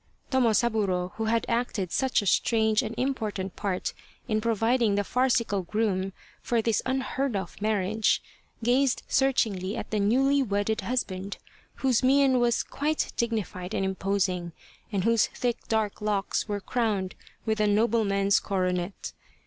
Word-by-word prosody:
Tomosaburo, 220 Hz, -7 st, +2 dB
who 225 Hz, -, -1 dB
had 230 Hz, +1 st, +1 dB
acted 230 Hz, -6 st, -1 dB
such 265 Hz, -5 st, +1 dB
a -, -, -6 dB
strange 220 Hz, +2 st, +3 dB
and 225 Hz, -, -5 dB
important 215 Hz, -8 st, -2 dB
part 195 Hz, -3 st, -2 dB, 0.3 s
in 215 Hz, -1 st, 0 dB
providing 230 Hz, 0 st, +2 dB
the 205 Hz, -, +1 dB
farcical 235 Hz, -4 st, +1 dB
groom 195 Hz, 0 st, -1 dB, 0.3 s
for 235 Hz, -, 0 dB
this 225 Hz, -1 st, +1 dB
unheard 265 Hz, -1 st, -1 dB
of 195 Hz, +1 st, -5 dB
marriage, 215 Hz, 0 st, +1 dB, 0.4 s
gazed 255 Hz, +2 st, +2 dB
searchingly 220 Hz, -7 st, +1 dB
at -, -, -6 dB
the 215 Hz, -, +1 dB
newly 270 Hz, +7 st, +3 dB
wedded 205 Hz, -2 st, 0 dB
husband, 200 Hz, -6 st, -3 dB, 0.5 s
whose 255 Hz, -4 st, +3 dB
mien 265 Hz, 0 st, +4 dB
was 240 Hz, -1 st, +2 dB
quite 305 Hz, +2 st, -2 dB
dignified 215 Hz, -5 st, -2 dB
and 195 Hz, -, 0 dB
imposing, 190 Hz, -3 st, -1 dB, 0.4 s
and 195 Hz, -3 st, 0 dB
whose 230 Hz, 0 st, +3 dB
thick 245 Hz, -1 st, -3 dB
dark 220 Hz, -2 st, -1 dB
locks 210 Hz, -1 st, -1 dB
were 205 Hz, -1 st, -2 dB
crowned 205 Hz, -4 st, -1 dB, 0.3 s
with 220 Hz, -1 st, 0 dB
a 210 Hz, -, +3 dB
nobleman's 205 Hz, -2 st, +2 dB
coronet. 185 Hz, -1 st, -2 dB
220 Hz, 140 wpm, -27 LUFS, 195-240 Hz, 0.5 s, mien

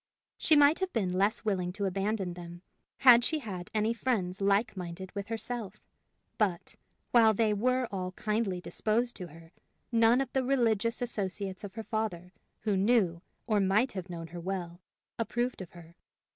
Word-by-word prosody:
She 315 Hz, -, +5 dB
might 290 Hz, +2 st, +6 dB
have 380 Hz, -1 st, -1 dB
been 190 Hz, -6 st, 0 dB
less 200 Hz, +5 st, +1 dB
willing 185 Hz, -4 st, 0 dB
to 200 Hz, +1 st, -2 dB
abandon 195 Hz, 0 st, -1 dB
them, 175 Hz, 0 st, -10 dB, 0.4 s
had 245 Hz, -3 st, +8 dB
she 315 Hz, +6 st, +1 dB
had 195 Hz, -10 st, -6 dB
any 215 Hz, +1 st, +1 dB
friends 200 Hz, -7 st, -1 dB
like 200 Hz, +3 st, +2 dB
minded 180 Hz, 0 st, -6 dB
with 200 Hz, -1 st, -5 dB
herself, 225 Hz, -2 st, -4 dB, 0.6 s
but, 190 Hz, -6 st, 0 dB, 0.4 s
while 225 Hz, -3 st, +6 dB
they 215 Hz, 0 st, +2 dB
were 255 Hz, +4 st, +1 dB
all 185 Hz, -2 st, -3 dB
kindly 210 Hz, -3 st, -1 dB
disposed 230 Hz, +6 st, -1 dB
to 180 Hz, -, -6 dB
her, 165 Hz, +1 st, -15 dB, 0.4 s
none 230 Hz, +1 st, +5 dB
of 270 Hz, -2 st, -2 dB
the 265 Hz, -, +1 dB
religious 230 Hz, -3 st, +1 dB
associates 200 Hz, -4 st, -3 dB
of 200 Hz, -1 st, -8 dB
her 225 Hz, -, -5 dB
father, 195 Hz, -6 st, -3 dB, 0.3 s
who 210 Hz, -3 st, 0 dB
knew, 190 Hz, -4 st, +2 dB, 0.2 s
or 215 Hz, -3 st, +2 dB
might 200 Hz, +6 st, +2 dB
have 185 Hz, -2 st, -6 dB
known 170 Hz, -1 st, -6 dB
her 175 Hz, -, -7 dB
well, 175 Hz, -1 st, -4 dB, 0.4 s
approved 240 Hz, 0 st, -1 dB
of 180 Hz, -, -8 dB
her. 170 Hz, -1 st, -14 dB
205 Hz, 170 wpm, -30 LUFS, 185-230 Hz, 0.6 s, had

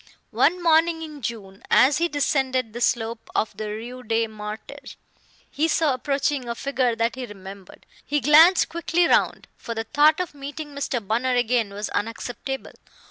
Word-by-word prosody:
One 360 Hz, +1 st, +2 dB
morning 325 Hz, 0 st, +3 dB
in 305 Hz, -2 st, -9 dB
June, 205 Hz, -4 st, -6 dB
as 275 Hz, +3 st, +5 dB
he 340 Hz, -, +2 dB
descended 265 Hz, -6 st, 0 dB
the 240 Hz, -, -6 dB
slope 230 Hz, -1 st, -1 dB
of 220 Hz, -, 0 dB
the 215 Hz, -1 st, -5 dB
Rue 235 Hz, +4 st, -7 dB
des 225 Hz, -1 st, 0 dB
Martyrs, 215 Hz, +6 st, -9 dB, 0.5 s
he 310 Hz, +3 st, 0 dB
saw 315 Hz, -3 st, +2 dB
approaching 275 Hz, -1 st, -1 dB
a 235 Hz, -, -2 dB
figure 255 Hz, -2 st, 0 dB
that 230 Hz, +1 st, 0 dB
he 255 Hz, -1 st, -6 dB
remembered. 195 Hz, -2 st, -12 dB, 0.2 s
He 295 Hz, +1 st, 0 dB
glanced 310 Hz, +7 st, +6 dB
quickly 340 Hz, +1 st, +1 dB
round, -, -, +1 dB
for 230 Hz, -, -6 dB
the 225 Hz, -, -2 dB
thought 300 Hz, +6 st, +3 dB
of 360 Hz, -4 st, -3 dB
meeting 290 Hz, +2 st, -7 dB
Mr. 260 Hz, -5 st, -3 dB
Bunner 250 Hz, +4 st, +1 dB
again 240 Hz, -3 st, +1 dB
was 205 Hz, +1 st, -5 dB
unacceptable. 245 Hz, +5 st, -4 dB
255 Hz, 165 wpm, -24 LUFS, 225-295 Hz, 0.5 s, glanced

